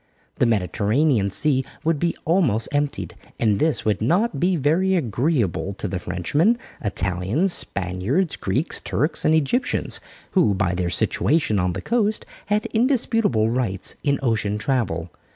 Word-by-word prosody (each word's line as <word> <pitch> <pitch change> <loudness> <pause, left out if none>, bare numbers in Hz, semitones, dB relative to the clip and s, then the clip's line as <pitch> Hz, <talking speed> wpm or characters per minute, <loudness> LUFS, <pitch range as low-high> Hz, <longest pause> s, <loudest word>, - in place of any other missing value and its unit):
The 125 - +3
Mediterranean 110 - +1
Sea 135 +5 +1 0.2
would 160 -2 +1
be 170 +2 0
almost 150 - +1
emptied, 145 - -2 0.3
and 105 -3 +2
this 155 -4 0
would 105 -2 0
not 175 - +1
be 180 +3 +2
very 170 +6 +2
agreeable 120 - 0
to - - -5
the 90 - -3
Frenchmen, 145 - +1 0.3
Italians, 100 - 0
Spaniards, 100 - -1
Greeks, 145 +7 0
Turks, 155 +1 0
and 155 - +4
Egyptians, 160 - 0 0.3
who 170 - +3
by 95 -2 0
their 90 -1 -1
situation 125 - +1
on 90 -1 0
the - - -6
coast, 220 -2 0 0.2
had 210 +1 +1
indisputable 225 - +2
rights 115 -7 -1
in 140 -1 +1
ocean 110 -4 0
travel. 105 - -1
130 Hz, 140 wpm, -22 LUFS, 100-165 Hz, 0.3 s, and